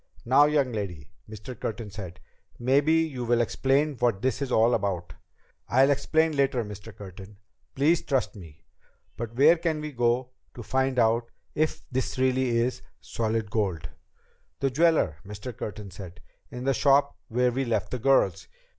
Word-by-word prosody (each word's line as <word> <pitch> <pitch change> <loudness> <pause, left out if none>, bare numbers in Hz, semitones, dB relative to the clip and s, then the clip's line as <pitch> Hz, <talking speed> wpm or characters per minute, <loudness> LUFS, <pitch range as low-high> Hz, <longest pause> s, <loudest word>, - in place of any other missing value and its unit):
"Now, 135 +5 +6
young 145 -4 +1
lady," 95 -8 -5 0.2
Mr. 110 +4 -8
Curtin 110 -2 -5
said, 95 -4 -8 0.4
"maybe 135 +5 +2
you 155 -6 0
will 120 0 +2
explain 135 +5 +1
what 115 -4 0
this 130 +1 0
is 135 -2 -2
all 115 +1 +4
about." 90 -6 -2 0.6
"I'll 135 +3 +4
explain 160 +2 +1
later, 135 -4 +1
Mr. 105 +2 -9
Curtin. 100 +1 -11 0.4
Please 155 +5 +3
trust 135 -3 -1
me. 80 -7 -13 0.5
But 115 0 -6
where 155 +6 +5
can 160 -2 -1
we 150 0 -5
go 120 0 0 0.2
to 120 - -8
find 130 +2 0
out 115 0 +2 0.2
if 155 +1 -1
this 130 +1 -2
really 130 0 +2
is 125 +2 0 0.2
solid 110 -2 -2
gold?" 95 -8 -1 0.7
"The 135 -1 0
jeweler," 155 - +2
Mr. 105 +4 -8
Curtin 105 -1 -7
said, 90 -1 -10 0.3
"in 125 0 -7
the 135 +1 +2
shop 140 +1 +3
where 125 0 +1
we 135 +3 -1
left 110 -6 -1
the 125 - -3
girls." 95 -8 +2
120 Hz, 160 wpm, -26 LUFS, 105-135 Hz, 0.7 s, Now